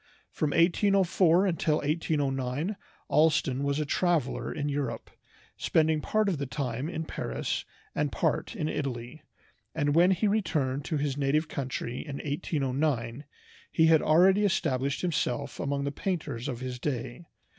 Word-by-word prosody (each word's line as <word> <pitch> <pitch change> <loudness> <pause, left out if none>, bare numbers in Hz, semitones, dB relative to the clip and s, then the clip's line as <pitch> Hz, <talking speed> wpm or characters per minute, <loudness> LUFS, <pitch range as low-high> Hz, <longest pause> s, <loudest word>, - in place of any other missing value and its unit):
From 155 - -1
1804 180 +1 +3
until 165 -4 +1
1809 145 +1 -1 0.3
Allston 150 -3 +2
was 140 +1 0
a 150 - 0
traveler 165 -3 0
in 145 - -3
Europe, 140 -6 -3 0.5
spending 155 -1 +2
part 215 +4 +1
of 180 -7 0
the 140 - -2
time 130 +1 -3
in 160 -2 -4
Paris - - -3 0.3
and - - 0
part - - -1
in 160 -8 -2
Italy, 135 -1 -4 0.5
and 145 -2 +1
when 175 +3 +5
he 190 +3 +2
returned 150 -10 0
to 160 - -1
his 140 -1 -1
native 145 +3 +1
country 130 -3 -4
in 145 -3 -6
1809 140 -4 -1 0.5
he 160 - +4
had 160 -1 +5
already 190 +6 +5
established 135 -8 0
himself 140 -5 -1
among 140 0 -1
the 140 - -1
painters 145 -7 -3
of 125 -3 -4
his 125 -1 -5
day. 140 +4 -4
150 Hz, 145 wpm, -28 LUFS, 135-165 Hz, 0.5 s, when